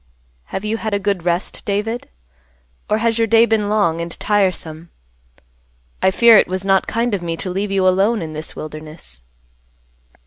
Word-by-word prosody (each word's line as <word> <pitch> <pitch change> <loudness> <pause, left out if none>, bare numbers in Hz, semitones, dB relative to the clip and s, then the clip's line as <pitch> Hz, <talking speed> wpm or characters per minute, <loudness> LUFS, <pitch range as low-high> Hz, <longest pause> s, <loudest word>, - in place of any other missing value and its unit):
"Have 195 - -5
you 220 +1 -1
had 220 -2 -2
a - - 0
good 195 -3 -2
rest, 175 +1 -2
David? 210 +4 -3 0.8
Or 215 - +2
has 230 0 0
your 225 - +2
day 230 +1 +5
been 220 -3 0
long 170 -6 +1
and 170 0 -6
tiresome? 180 -5 -1 1.1
I - - +4
fear 230 +3 +6
it - - +4
was 185 +1 -4
not 195 -1 +2
kind 230 0 -1
of 195 - -1
me 165 -1 -3
to 185 - -4
leave 195 +3 -2
you 190 -1 +2
alone 195 +3 +2
in 155 -1 -7
this 155 +1 -5
wilderness." 155 - -9
195 Hz, 175 wpm, -19 LUFS, 170-215 Hz, 1.1 s, fear